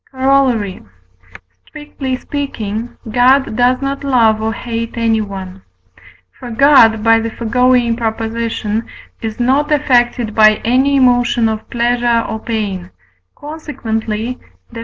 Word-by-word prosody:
Corollary. 260 -7 +1 0.9
Strictly 295 -3 -5
speaking, 235 -6 -5
God 255 +1 +3
does 250 +3 +2
not 275 +1 -3
love 230 -5 +2
or 220 0 -1
hate 230 +1 -5
anyone. 200 -5 -2 0.8
For 245 - -8
God 225 -3 +4
(by 225 0 +4
the 225 0 -3
foregoing 240 +1 +1
Prop.) 225 -2 -2
is 225 0 -5
not 270 +5 +1
affected 245 -5 +1
by 215 -1 +5
any 260 +4 +2
emotion 245 -3 +3
of 220 -1 -4
pleasure 240 -1 +1
or 220 - -4
pain, 205 -6 -4 0.5
consequently 245 -6 -5 0.3
(Def. 230 - -7
235 Hz, 115 wpm, -15 LUFS, 220-255 Hz, 0.9 s, by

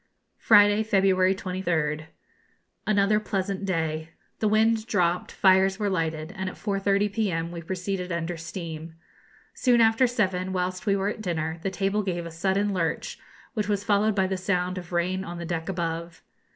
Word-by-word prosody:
Friday, 205 -1 +6
February 190 -3 +3
23rd. 170 -5 -2 0.8
Another 210 0 +3
pleasant 195 -2 -2
day. 160 -3 -2 0.3
The 215 - +2
wind 220 +1 +2
dropped, 180 -5 +1
fires 190 0 +4
were 205 -2 -1
lighted, 160 -1 -2
and 190 -1 -3
at - - -10
4.30 200 0 0
p.m. 175 -6 -1
we 170 -1 -6
proceeded 185 +1 -3
under 170 +1 -2
steam. 165 -1 -7 0.6
Soon 245 -2 +3
after 225 +3 +5
seven, 190 -6 -1
whilst 185 +2 -2
we 200 - +4
were 195 +1 0
at 215 - -5
dinner, 160 -4 -2
the 195 - -1
table 195 +2 0
gave 175 -4 -3
a 170 - -7
sudden 195 +4 0
lurch, 165 -3 -2 0.3
which 215 -4 -2
was 205 -1 0
followed 210 +1 +2
by 190 -2 +2
the 190 0 -1
sound 185 -1 -1
of 175 -1 -11
rain 180 +2 0
on 175 -2 -6
the 170 - -5
deck 165 0 -3
above. 170 -2 -4
190 Hz, 165 wpm, -26 LUFS, 170-205 Hz, 0.8 s, Friday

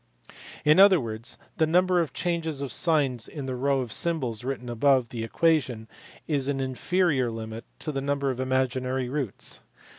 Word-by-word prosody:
In 150 +4 +6
other 195 -2 +8
words 115 -2 -5 0.2
the 160 - +3
number 180 +2 +3
of 165 -6 0
changes 160 -3 -2
of 140 - -4
signs 140 -8 +1
in 145 -3 -7
the 130 - -3
row 135 +1 +1
of 120 -3 -5
symbols 130 -8 -1
written 125 -1 -4
above 125 +1 +2
the 115 -2 -5
equation 125 -4 +1 0.4
is 140 -4 +1
an 140 -1 -1
inferior 135 +1 +1
limit 115 0 -6
to 155 - -2
the 135 -2 -3
number 140 0 0
of 130 - -6
imaginary 130 0 0
roots. 135 -6 -3
135 Hz, 170 wpm, -26 LUFS, 125-155 Hz, 0.4 s, other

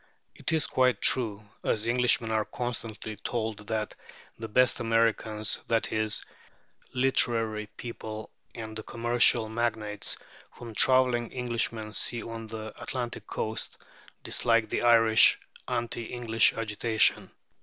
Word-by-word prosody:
It - - -4
is 160 -2 +1
quite 125 -4 +2
true, 105 -5 +2 0.2
as 110 0 0
Englishmen 120 -1 +2
are 110 -1 +1
constantly 110 -3 -5
told, 110 -1 -4
that 110 -1 -2 0.4
"the 115 - -7
best 125 +3 +3
Americans," 115 -2 +1
that 115 -1 0
is, 110 -1 0 0.7
the - - -12
literary 115 -5 +1
people 110 -2 -7 0.2
and 110 -1 -7
the 110 - -5
commercial 120 0 +3
magnates, 110 -2 -2 0.4
whom 115 -2 -10
travelling 125 -1 +3
Englishmen 115 -3 -2
see 120 +2 -1
on 115 -1 -7
the 110 -1 -7
Atlantic 120 -2 -5
coast, 110 +1 -4 0.5
dislike 115 -2 +1
the - - -1
Irish 115 -2 +6 0.3
anti 120 0 -3
English 115 -2 +2
agitation. 110 0 +1
115 Hz, 125 wpm, -28 LUFS, 110-120 Hz, 0.7 s, Irish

